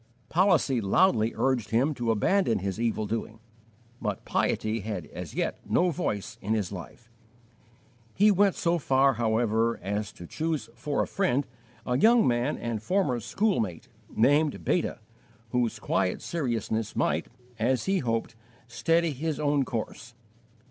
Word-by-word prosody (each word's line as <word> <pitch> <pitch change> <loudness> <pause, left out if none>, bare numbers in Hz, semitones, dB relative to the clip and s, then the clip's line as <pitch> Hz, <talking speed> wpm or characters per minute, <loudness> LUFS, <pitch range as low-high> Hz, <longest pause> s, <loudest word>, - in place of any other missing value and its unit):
Policy 165 - +3
loudly 110 - +3
urged 130 -6 +1
him 130 +7 +2
to 120 -4 -3
abandon 115 - +2
his 95 +3 -3
evil 115 -2 0
doing, 110 +1 -4 0.6
but 105 -4 -3
piety 110 +1 0
had 100 -5 -4
as - - -7
yet - - -1
no 180 0 +2
voice 105 - -3
in 110 +3 0
his 100 -4 -2
life. 100 +5 -10 1.0
He 210 +2 +5
went 200 0 +3
so 170 0 +1
far, 135 -1 +3
however, 115 0 +1
as 105 +1 -2
to 85 - -10
choose 160 - -3
for 145 -2 -1
a - - -5
friend 145 -9 0 0.4
a 125 0 0
young 230 - +5
man 120 +4 +1
and 115 -3 -3
former 165 - +1
schoolmate, 115 - -1 0.2
named 145 +6 +2
Beta, - - 0 0.5
whose 120 -2 0
quiet 95 -3 -1
seriousness 115 -8 -2
might, - - 0 0.3
as 125 +3 +1
he 195 0 +2
hoped, 115 -6 -2 0.3
steady 165 +7 +1
his 150 +2 -3
own 145 -2 +2
course. 120 +1 -5
120 Hz, 140 wpm, -27 LUFS, 110-155 Hz, 1.0 s, He